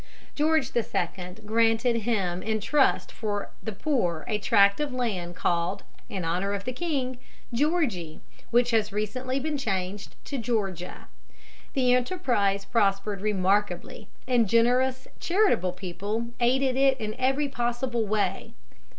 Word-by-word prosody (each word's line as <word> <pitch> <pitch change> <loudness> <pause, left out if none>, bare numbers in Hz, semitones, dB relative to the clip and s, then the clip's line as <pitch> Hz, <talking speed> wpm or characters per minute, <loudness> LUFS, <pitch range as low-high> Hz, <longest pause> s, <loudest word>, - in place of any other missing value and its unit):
George 305 -3 +1
II. 180 -5 -2
granted 225 +2 +2
him 195 -6 -1
in 220 0 -1
trust 275 +6 +2
for 205 -2 -3
the 220 - -4
poor 195 - -1
a 210 -2 0
tract 200 +1 +4
of 295 -2 -1
land 200 -9 -2
called, 175 +3 0 0.3
in 185 -4 -4
honor 180 +5 0
of 200 -1 -3
the 255 - -3
king, 260 -5 -2 0.3
Georgie, 235 - 0 0.3
which 240 +1 +3
has 215 -2 +2
recently 255 +6 -2
been 295 +1 -2
changed 195 -4 -3
to 275 - -3
Georgia. 200 -7 -3 0.7
The 250 -2 +4
enterprise 245 - +1
prospered 195 -2 +1
remarkably, 200 -2 0 0.2
and 240 -5 +3
generous 250 +3 +3
and - - -23
charitable 345 - +2
people 200 +5 -4
aided 255 +2 +2
it 270 0 +3
in 215 -1 -3
every 270 +3 +2
possible 240 -2 -1
way. 205 -2 -1
225 Hz, 135 wpm, -27 LUFS, 195-255 Hz, 0.7 s, tract